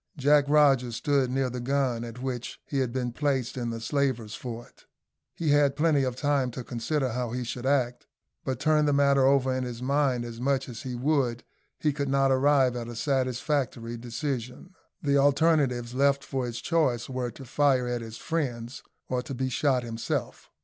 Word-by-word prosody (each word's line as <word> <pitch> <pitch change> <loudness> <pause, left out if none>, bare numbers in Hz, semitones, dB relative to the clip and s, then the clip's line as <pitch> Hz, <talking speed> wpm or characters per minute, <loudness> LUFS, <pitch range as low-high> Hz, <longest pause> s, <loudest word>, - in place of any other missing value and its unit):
Jack 145 +1 +4
Rogers 135 -5 +4
stood 140 0 +1
near 130 0 0
the 125 - -4
gun 130 -2 0
at 120 +2 -8
which 125 -2 -4
he 140 - -2
had 130 -3 0
been 125 -1 -2
placed 135 -2 -1
in 120 -2 -2
the 115 0 -4
slavers' 120 -4 -1
fort. 120 -1 -8 0.5
He 165 -3 -1
had 145 -1 +4
plenty 150 -2 +3
of 130 -2 -1
time 140 -1 +1
to 125 - -5
consider 130 +3 -2
how 125 0 -2
he 125 0 -2
should 120 +2 -4
act; 125 -3 0 0.4
but, 130 -2 -3
turn 150 +1 +3
the 145 - +3
matter 140 -1 +4
over 135 -1 +3
in 130 0 -1
his 120 -2 -5
mind 130 -2 +1
as 115 0 -8
much 135 0 +1
as 120 -4 -7
he 125 -1 -5
would, 125 -2 0 0.3
he 150 -2 0
could 140 -1 -2
not 135 0 +3
arrive 135 -1 +3
at 120 -1 -4
a 120 - -7
satisfactory 130 -2 -1
decision. 125 - -5 0.3
The 140 -1 +3
alternatives 140 -4 +2
left 140 +1 +2
for 130 -2 -3
his 120 -1 -5
choice 135 -8 +1
were 125 -2 -3
to 135 +3 -11
fire 135 -1 +2
at 120 -1 -2
his 115 -1 -8
friends 125 -7 -3 0.3
or 125 -1 -1
to 135 - -6
be 130 +1 -1
shot 130 0 +1
himself. 115 -1 -4
130 Hz, 190 wpm, -27 LUFS, 120-140 Hz, 0.5 s, Jack